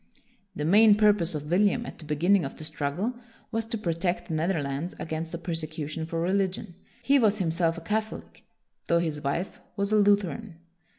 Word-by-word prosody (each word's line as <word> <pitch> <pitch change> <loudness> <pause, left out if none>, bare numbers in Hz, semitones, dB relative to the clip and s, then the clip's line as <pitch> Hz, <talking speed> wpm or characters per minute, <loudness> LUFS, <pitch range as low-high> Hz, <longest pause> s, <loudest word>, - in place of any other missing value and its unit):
1 - - -40 0.5
The 150 - -2
main 210 +5 +7
purpose 205 -6 +3
of 150 +1 -5
William 205 +6 +3
at - - -9
the 160 - -9
beginning 170 +6 +3
of 135 - -5
the - - -7
struggle 155 - -2 0.4
was 225 0 -1
to 225 0 -3
protect 175 -2 -2
the - - -2
Netherlands 155 -1 -1
against 160 +1 -4
a - - -3
persecution 160 -2 -4
for 165 0 -3
religion. 185 0 -1 0.3
He 280 0 +4
was 215 -3 +3
himself 165 -2 0
a - - -6
Catholic, 215 +5 -4 0.4
though 170 - +3
his 160 -3 -1
wife 170 +7 -2 0.2
was 200 +1 0
a 215 - +4
Lutheran. 205 -1 +2
175 Hz, 180 wpm, -27 LUFS, 160-205 Hz, 0.5 s, main